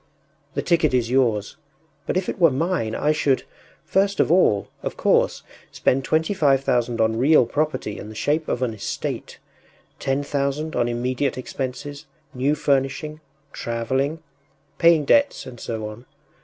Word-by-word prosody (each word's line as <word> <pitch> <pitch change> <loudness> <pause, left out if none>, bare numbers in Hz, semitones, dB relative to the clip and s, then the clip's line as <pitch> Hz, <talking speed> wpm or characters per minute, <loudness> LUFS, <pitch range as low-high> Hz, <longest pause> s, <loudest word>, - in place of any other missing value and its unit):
The - - -1
ticket 165 -6 +2
is 120 -1 0
yours, 115 -6 +1 0.5
but - - 0
if 185 - -1
it - - -4
were 170 -2 +6
mine 145 -5 -1
I 150 - +2
should, 145 -3 +1 0.4
first 200 +1 +1
of - - +3
all, 165 - +3
of - - -5
course, - - +2 0.3
spend 135 +1 +1
twenty 160 +7 +1
five 140 -7 +3
thousand 120 -2 0
on 110 0 +2
real 140 0 +5
property 150 -7 -2
in 105 - -8
the 110 - -10
shape 150 +8 0
of 125 - -1
an 120 -3 -1
estate; 100 -2 -5 0.6
ten 135 +1 0
thousand 145 +2 -2
on 120 -1 +1
immediate 125 +3 -1
expenses, 140 +3 -5 0.3
new 135 +4 +1
furnishing... 145 +2 -1 0.3
travelling... 130 +7 -2 0.6
paying 165 -3 +5
debts, 285 - +3
and 120 -2 -10
so 110 -2 -4
on.... 110 +4 -11
135 Hz, 155 wpm, -23 LUFS, 120-155 Hz, 0.6 s, were